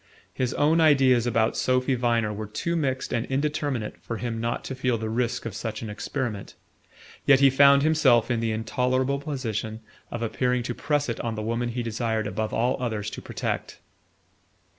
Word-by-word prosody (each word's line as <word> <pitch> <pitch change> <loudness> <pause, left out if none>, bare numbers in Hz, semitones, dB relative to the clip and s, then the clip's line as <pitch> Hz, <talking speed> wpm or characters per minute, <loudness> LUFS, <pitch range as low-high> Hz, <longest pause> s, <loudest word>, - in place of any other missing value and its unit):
His 130 -1 -1
own 155 +3 +3
ideas 130 -6 +4
about 115 -1 +1
Sophy 130 +1 +1
Viner 115 -3 +1
were 105 +1 -5
too 170 +11 -2
mixed 135 -5 -1
and 115 -2 +1
indeterminate 140 -4 -2
for 115 - -5
him 115 0 -3
not 115 +1 -2
to - - -5
feel 125 -2 0
the 110 0 -4
risk 120 0 -1
of 115 - -4
such 115 0 -4
an 110 - -5
experiment; 110 -1 -4 0.7
yet 135 -2 +7
he 135 -1 +6
found 140 +1 +6
himself 140 -7 +4
in 120 - +1
the 115 -1 0
intolerable 130 +4 0
position 115 -7 -4 0.3
of 115 - -4
appearing 125 +2 0
to 120 - -3
press 145 +2 0
it 115 - -3
on 115 -1 -3
the 110 - -4
woman 115 +2 -1
he 120 +1 -3
desired 115 -1 -1
above 110 +1 -2
all 125 +3 0
others 110 -4 -2
to - - -7
protect... - - -4
120 Hz, 185 wpm, -26 LUFS, 115-135 Hz, 0.7 s, yet